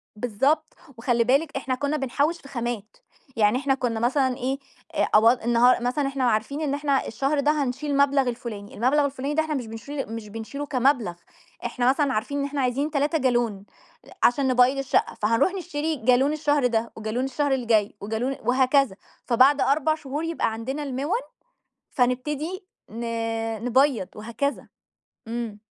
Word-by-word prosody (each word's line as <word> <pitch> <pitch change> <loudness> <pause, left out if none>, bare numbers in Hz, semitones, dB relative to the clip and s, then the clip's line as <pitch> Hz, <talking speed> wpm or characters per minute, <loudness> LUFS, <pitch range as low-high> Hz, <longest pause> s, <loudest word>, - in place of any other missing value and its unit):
بالضبط، 270 +8 0 0.2
وخلّي 235 0 +2
بالِك 275 +4 +1
إحنا 260 -1 -2
كنّا 285 +3 -1
بنحوّش 285 +5 0
في 275 - -13
خامات، 235 - -4 0.4
يعني 215 +2 +3
إحنا 275 0 +1
كنا 240 -4 -1
مثلًا 260 +1 +1
إيه، 265 +2 -2 0.4
أ - - +2
أو 225 +2 +7
النها 240 +1 +4
مثلًا 255 +4 0
إحنا 275 -1 -2
عارفين 245 +6 0
إن 285 -2 -1
إحنا 285 -2 0
الشهر 280 +2 0
ده 295 +2 +3
هنشيل 270 +3 -3
المبلَغ 280 -2 +3
الفلاني، 215 -4 -7
المبلَغ 280 +6 +2
الفلاني 280 +1 -3
ده 315 - +3
إحنا 310 -1 -3
مش 245 -4 -3
بنشيل 225 +2 -6
مش 220 -2 -7
بنشيله 225 +7 -6
كمبلَغ، 255 -9 +1 0.5
إحنا 250 0 +1
مثلًا 275 -1 +2
عارفين 265 +7 -2
إن 280 - 0
إحنا 285 -1 -2
عايزين 270 +4 0
3 295 +2 +1
جالون 240 -7 0 0.4
أ - - -17 0.2
عشان 265 +2 0
نبيّض 255 +1 +4
الشقة، 270 -1 0
فهنرُوح 230 - +2
نشتري 320 -4 -2
جالون 255 +4 +3
الشهر 290 -4 +2
ده 230 -1 -1
وجالون 220 +4 -2
الشهر 285 +1 -1
الجاي 225 -6 +1
وجالون 225 +6 -2
وهكذا، 260 -3 +3 0.3
فبَعد 265 +4 +4
4 310 +2 +2
شهور 295 +1 -5
يبقى 330 -9 -1
عندنا 265 +6 -4
المِوَن، 285 - -1 0.7
فنبتدي 295 - -1 0.2
ن 230 +2 -7 0.6
نبيّض 260 -4 +2
وهكذا. 235 +7 -3 0.6
إمم. 230 -3 -4
265 Hz, 160 wpm, -25 LUFS, 235-285 Hz, 0.7 s, أو